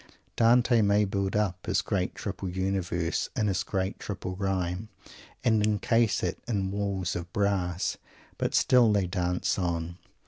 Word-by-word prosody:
Dante 120 0 +4
may 105 0 +3
build 100 0 -1
up 95 -4 -1
his - - +1
great - - -1
triple 95 - -4
universe 90 -2 -1
in 110 -5 +1
his 95 -3 +1
great 95 +1 -2
triple 95 -2 -5
rhyme, 95 +1 -2 0.5
and 110 -4 +3
encase 110 +1 +2
it 90 0 -2
in 100 -4 -1
walls 100 -3 -2
of 85 0 -5
brass. 95 -3 0 0.4
But - - 0
still 125 -4 +5
they 100 -2 +2
dance 90 +1 -1
on. 85 -1 -2
95 Hz, 145 wpm, -28 LUFS, 90-105 Hz, 0.5 s, still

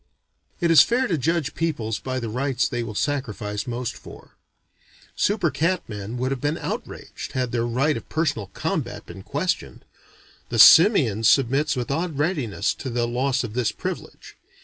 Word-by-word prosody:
It 170 -2 +2
is 160 -4 +9
fair 250 +3 +2
to 185 - 0
judge 155 0 -1
peoples 120 -10 -2
by 130 0 -3
the 120 - -4
rights 130 +3 0
they 120 - -3
will 115 -3 -6
sacrifice 110 -5 -3
most 120 -1 -3
for. - - -13 0.8
Super 200 -6 +1
cat 170 +7 0
men 105 +2 -6
would 130 +2 -1
have 135 - -3
been 145 +2 0
outraged, - - -6
had 125 -2 -1
their 120 -1 0
right 135 +6 +1
of - - -8
personal 145 - -1
combat 95 - -4
been - - -10
questioned. - - -3 0.6
The 120 - -2
simian 125 - +7
submits 135 +5 +3
with 125 +1 -3
odd 160 0 -2
readiness 145 - 0
to 130 - -4
the 120 -1 -1
loss 130 +2 0
of 115 -3 -6
this 125 -1 0
privilege. - - -7
130 Hz, 170 wpm, -23 LUFS, 115-155 Hz, 0.8 s, is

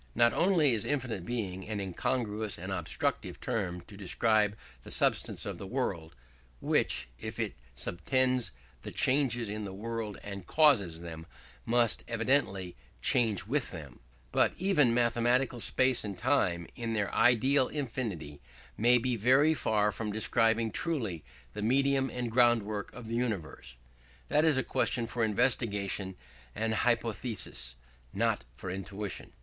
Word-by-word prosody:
Not 120 0 +4
only 170 -7 +3
is 110 - -1
infinite 125 -10 -2
Being 95 -6 -3
an 105 -2 -3
incongruous 105 +2 -2
and 95 +3 -6
obstructive 90 -4 -2
term 95 -7 -2
to 100 +4 -13
describe 105 +2 +1 0.2
the - - -12
substance - - +1
of - - -5
the 100 - -7
world 90 - -3 0.4
(which, 65 - +1
if - - -6
it - - -1 0.2
subtends 125 - +1 0.3
the - - -7
changes 130 -4 +2
in 105 +1 -4
the 95 -2 -6
world 110 0 -4
and 100 -3 -7
causes 105 - +4
them, 80 -1 -8 0.4
must 120 -1 +2
evidently 115 -6 0 0.2
change 110 - +2
with 130 +4 -1
them), 75 -8 -9 0.3
but - - +3
even 175 -10 +3
mathematical 120 +2 +2
space 130 +2 +3
and 100 -3 -5
time, 95 -8 +1
in 115 -1 -3
their 105 -2 -1
ideal 125 +3 +4
infinity, 110 - -4 0.3
may 120 +3 +4
be 125 +1 0
very 130 +8 +4
far 105 -7 +1
from 105 +1 -4
describing 115 +1 +2
truly 110 - -2 0.3
the - - -5
medium 135 +3 +2
and 120 -2 -4
groundwork 115 -4 +2
of 125 - -9
the 115 - -5
universe. 95 - -3 0.5
That 150 - +3
is 155 -4 +4
a 130 - +1
question 120 -1 0
for 115 +1 -2
investigation 105 -4 0 0.4
and 110 +1 -1
hypothesis, 110 - -1 0.4
not - - 0
for 90 +7 -6
intuition. 100 +1 -5
115 Hz, 140 wpm, -30 LUFS, 100-125 Hz, 0.5 s, Not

